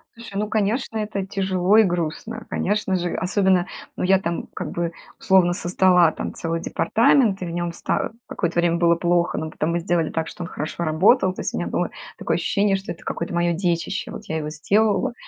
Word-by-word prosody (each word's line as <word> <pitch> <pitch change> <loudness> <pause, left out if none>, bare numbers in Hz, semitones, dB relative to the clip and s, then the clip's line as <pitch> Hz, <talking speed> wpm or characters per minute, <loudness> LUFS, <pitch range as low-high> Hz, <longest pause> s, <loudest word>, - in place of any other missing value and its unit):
Слушай, 230 -4 -11
ну, 210 0 -2
конечно, 220 +2 0
это 210 -2 -2
тяжело 190 0 +1
и 220 - +8
грустно, 180 +5 -3
конечно 205 -1 0
же. 175 -1 -1
Особенно 185 -1 +2 0.3
ну, - - -3
я 190 +1 +4
там 170 -3 -3
как - - -4
бы 170 -1 -2 0.3
условно 185 -2 +4
создала 180 -1 +3
там - - -5
целый 165 0 -3
департамент, 220 +3 +2
и - - -2
в 170 - -5
нём 175 0 -2
ста - - -2 0.2
какое-то 170 -2 -1
время 170 0 +2
было 170 0 +4
плохо, 175 0 +1
но 155 0 -3
потом 155 +2 -1
мы 170 - 0
сделали 170 -2 0
так, 160 0 -2
что 180 - -7
он 170 - -6
хорошо 155 +3 -4
работал. 185 +5 +3
То - - -6
есть - - -3
у - - -2
меня - - -2
было - - -1 0.3
такое - - -1
ощущение, 200 -1 +1
что 195 +1 -5
это 170 - -10
какое-то 170 - -4
моё 175 0 +2
детище, 175 +3 -2
вот - - -8
я 160 - -3
его 150 -1 -3
сделала, 200 +8 +1
180 Hz, 210 wpm, -22 LUFS, 170-200 Hz, 0.3 s, и